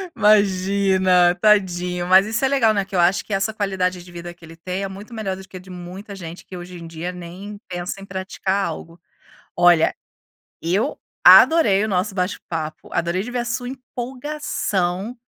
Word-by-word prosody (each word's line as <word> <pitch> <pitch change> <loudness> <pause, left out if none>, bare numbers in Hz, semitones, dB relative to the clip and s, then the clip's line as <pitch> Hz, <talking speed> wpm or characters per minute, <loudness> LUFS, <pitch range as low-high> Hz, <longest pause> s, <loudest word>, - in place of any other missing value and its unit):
Imagina 190 -3 +3
tadinho. 180 -4 +1
Mas 190 +2 +6
isso 220 +4 -2
é - - +5
legal, 255 -5 +3
né, 200 -2 0
que 190 0 -9
eu 180 - +2
acho 175 +3 +3
que 210 - -6
essa 195 +3 0
qualidade 185 -3 -1
de 175 - -14
vida 175 0 -8
que 175 - -24
ele 165 0 -12
tem 185 +3 -4
é 195 - -2
muito 200 +5 -10
melhor 210 -4 -3
do 190 - -12
que 185 - -10
a - - -9
de 185 +1 -16
muita 185 +3 -9
gente 170 -2 -9
que 185 - -9
hoje 175 0 -9
em 170 - -9
dia 165 +2 -5
nem 180 +4 -9
pensa 180 +2 -5
em - - -9
praticar 190 +1 -2
algo. 165 +1 -7 0.6
Olha 175 -2 +4 0.7
eu 195 - 0 0.3
adorei 215 -12 +7
o 215 - 0
nosso 190 0 -1
bate 180 0 -1
papo, 155 -2 -5
adorei 170 +2 0
de 235 - -7
ver 245 - -2
a 240 - -2
sua 245 +1 -3
empolgação 245 -6 -3
190 Hz, 190 wpm, -21 LUFS, 175-210 Hz, 0.7 s, adorei